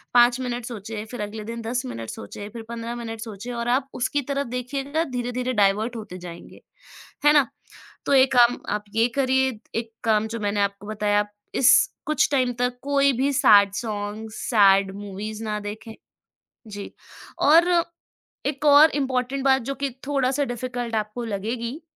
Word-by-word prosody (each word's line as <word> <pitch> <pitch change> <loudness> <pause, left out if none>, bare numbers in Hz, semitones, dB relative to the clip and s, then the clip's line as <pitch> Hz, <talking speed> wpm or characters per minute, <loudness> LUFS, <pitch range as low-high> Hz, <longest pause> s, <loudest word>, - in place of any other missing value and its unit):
5 240 +1 +6
minute 245 -2 -3
सोचें, 220 -2 -6
फिर 245 - -5
अगले 210 +1 -5
दिन 230 +1 -5
10 240 +2 -2
मिनट 115 - -6
सोचें, 205 - -8
फिर 230 -1 -7
15 235 0 -5
मिनट 225 -2 -6
सोचें 225 +1 -7
और 235 0 -3
आप 265 +2 +1
उसकी 285 +3 0
तरफ 280 -2 -1
देखिएगा, 270 +5 -2
धीरे-धीरे 250 -2 -3
डाइवर्ट 210 +3 +2
होते 205 -4 -8
जाएँगे। 175 -1 -11 0.6
है 295 - +7
ना? 290 -3 +5 0.6
तो - - +1
एक 265 0 +5
काम 240 0 +5 0.2
आप 210 - -8
ये 230 +1 +4
करिए, 265 -3 +2 0.2
एक 230 0 -3
काम 220 -1 +2
जो 230 0 -5
मैंने 205 0 -1
आपको 200 0 -3
बताया, 210 -1 +1 0.3
इस 260 - +6 0.3
कुछ 305 -2 +2
टाइम 255 -2 +2
तक 245 0 0
कोई 280 0 +3
भी 280 +1 +2
सैड 205 -7 +6
सॉन्ग्स, 215 -1 -5
सैड 195 -3 +5
मूवीज़ 205 +2 -6
ना 210 -1 -2
देखें। 215 +2 -7 0.7
जी। 205 -1 -8 0.5
और 335 +4 +5 0.8
एक 285 +1 -3
और 295 +2 +8
इम्पॉर्टेंट 265 -1 -1
बात, 265 -1 +4
जो 275 +3 -4
कि 280 0 -2 0.2
थोड़ा 270 -3 +1
सा 285 +1 0
डिफिकल्ट 245 -1 -4
आपको 215 +3 -3
लगेगी 230 - -4
235 Hz, 165 wpm, -24 LUFS, 210-260 Hz, 0.8 s, और